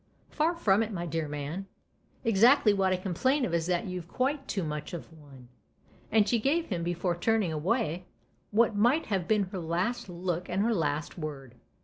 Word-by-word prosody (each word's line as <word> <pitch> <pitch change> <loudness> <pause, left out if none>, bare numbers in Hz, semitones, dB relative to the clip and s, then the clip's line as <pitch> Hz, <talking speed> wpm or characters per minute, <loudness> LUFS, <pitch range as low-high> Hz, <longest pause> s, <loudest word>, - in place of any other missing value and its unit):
" - - -36
"Far 325 +3 +1
from 210 - +3
it, 225 0 -2
my 175 -4 -3
dear 165 -2 -2
man. 150 +6 -5 0.6
Exactly 225 +1 +5
what 190 -1 +2
I 185 - +2
complain 250 - +1
of 175 - -4
is 170 0 0
that 180 -1 0
you've 180 -3 -5
quite 270 - -1
too 195 - -2
much 150 0 -5
of 165 0 -9
one." 140 -5 -15 0.6
And 215 -1 +4
she 235 +2 +2
gave 305 +8 +1
him, 180 -5 -2
before 175 +1 -1
turning 200 -1 +1
away, 180 +1 -1 0.4
what 225 +1 +3
might 240 +10 +3
have 190 -5 -1
been 215 -2 +3
her 190 - -4
last 185 +8 -2
look 175 0 -3
and 190 +3 +1
her 230 +1 +2
last 155 -2 -2
word. 140 -5 -6
185 Hz, 195 wpm, -29 LUFS, 165-225 Hz, 0.6 s, Exactly